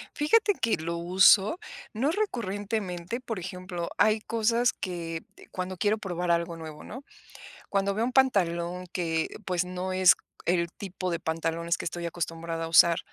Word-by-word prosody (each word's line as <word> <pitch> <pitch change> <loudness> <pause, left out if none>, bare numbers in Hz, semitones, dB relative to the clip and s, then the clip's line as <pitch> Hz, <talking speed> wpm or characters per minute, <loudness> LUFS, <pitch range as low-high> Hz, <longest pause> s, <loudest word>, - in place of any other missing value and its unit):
Fíjate 410 +8 +3
que 225 - +3
lo 170 +1 -3
uso, 190 - +5 0.4
no 265 +8 +1
recurrentemente, 205 - -3
por 225 -5 -4
ejemplo, 180 -1 -5
hay 215 0 +4
cosas 230 +2 +1
que, 170 -3 -5
eh, - - -15
cuando 185 0 -4
quiero 210 +4 +2
probar 180 -3 -2
algo 170 0 0
nuevo, 155 -2 -9
¿no?, 260 +5 -9 0.6
cuando 195 0 0
veo 225 +2 +1
un 255 - -2
pantalón 180 -8 +1
que, 165 -3 -1 0.2
pues, 180 -1 0
no 185 +1 -4
es 185 -1 +7 0.3
el 170 -1 +1
tipo 185 -1 -5
de 170 - -2
pantalones 165 0 -1
que - - -6
estoy 170 +1 -4
acostumbrada 165 0 -4
a - - -5
usar, 165 0 +6
180 Hz, 160 wpm, -28 LUFS, 170-215 Hz, 0.6 s, es